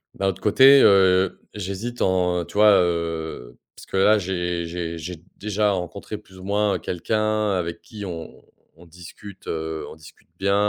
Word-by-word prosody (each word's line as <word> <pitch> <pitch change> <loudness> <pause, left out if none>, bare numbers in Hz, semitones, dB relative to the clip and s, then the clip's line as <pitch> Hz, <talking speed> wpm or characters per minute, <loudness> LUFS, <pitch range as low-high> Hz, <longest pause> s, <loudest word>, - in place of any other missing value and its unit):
d'un 95 - -1
autre 95 0 -2
côté, 135 +6 +7
heu, 95 -1 +4
j'hésite 105 +5 -5
en 90 -2 +1
tu - - -15
vois, 105 -2 +6
heu 80 -7 -3 0.2
parce - - -13
que 95 - -3
là 105 +3 +5
j'ai 90 -2 -2
j'ai 85 -1 -5
j'ai 90 +3 -6 0.2
déjà 105 0 0
rencontré 100 +3 -5
plus 95 -3 -17
ou - - -11
moins, 100 0 +1
heu, - - -3
quelqu'un 110 +4 -1
avec 85 -2 -3
qui 105 -4 -9
on 85 -3 -8 0.3
on 85 +2 -17
discute, 90 +4 -13
heu, 80 0 -4
on - - -11
discute 80 +1 -17
bien, 100 +1 +1
95 Hz, 175 wpm, -23 LUFS, 85-105 Hz, 0.3 s, côté